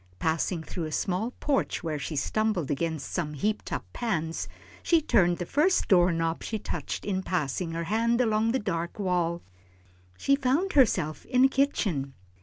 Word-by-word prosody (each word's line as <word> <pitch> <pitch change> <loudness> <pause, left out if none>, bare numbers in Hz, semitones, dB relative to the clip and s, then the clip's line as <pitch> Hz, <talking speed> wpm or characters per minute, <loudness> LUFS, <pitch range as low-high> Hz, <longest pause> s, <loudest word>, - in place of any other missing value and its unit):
Passing 160 - 0
through 165 +1 -4
a 155 - -5
small 190 +8 -1
porch 285 -2 0
where 155 -3 -2
she 155 +2 -4
stumbled 200 0 0
against 160 0 -2
some 150 -4 -2
heaped 210 +9 -2
up - - -3
pans, 165 -9 -2 0.3
she 335 - +4
turned 185 - +3
the 175 - -3
first 320 - +2
door 180 -2 +5
knob 165 0 -1
she 220 - -2
touched - - -5
in 190 -2 -1
passing 165 -1 -2
her 165 0 -2
hand 230 +6 +1
around 225 -2 +2
the 260 - +2
dark 170 -7 -3
wall. 175 -3 0 0.7
She 275 - +3
found 280 +8 +1
herself 185 - +3
in 255 0 +4
a - - +5
kitchen. 195 - 0
185 Hz, 170 wpm, -28 LUFS, 165-235 Hz, 0.7 s, door